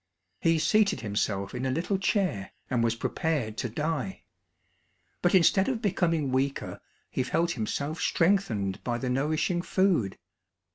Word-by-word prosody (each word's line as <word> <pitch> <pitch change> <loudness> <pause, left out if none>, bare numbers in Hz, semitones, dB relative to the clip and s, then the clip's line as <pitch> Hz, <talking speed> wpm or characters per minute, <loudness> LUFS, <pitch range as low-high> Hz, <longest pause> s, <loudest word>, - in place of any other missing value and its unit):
He 165 0 +3
seated 200 +5 +2
himself 100 -2 -2
in 125 - -4
a 130 - 0
little 175 +8 -1
chair, 185 - 0 0.2
and 120 -2 +2
was 115 0 +1
prepared 130 -4 -1
to 120 - -2
die. 160 - -3 1.0
But - - +3
instead 190 +4 +4
of 250 -4 -1
becoming 165 - 0
weaker 135 +2 -1 0.3
he - - -1
felt 170 +6 0
himself 140 +5 -3
strengthened 125 - +1
by 120 -1 -1
the 125 +1 -2
nourishing 155 +6 0
food. 175 - +1
155 Hz, 140 wpm, -28 LUFS, 120-180 Hz, 1.0 s, instead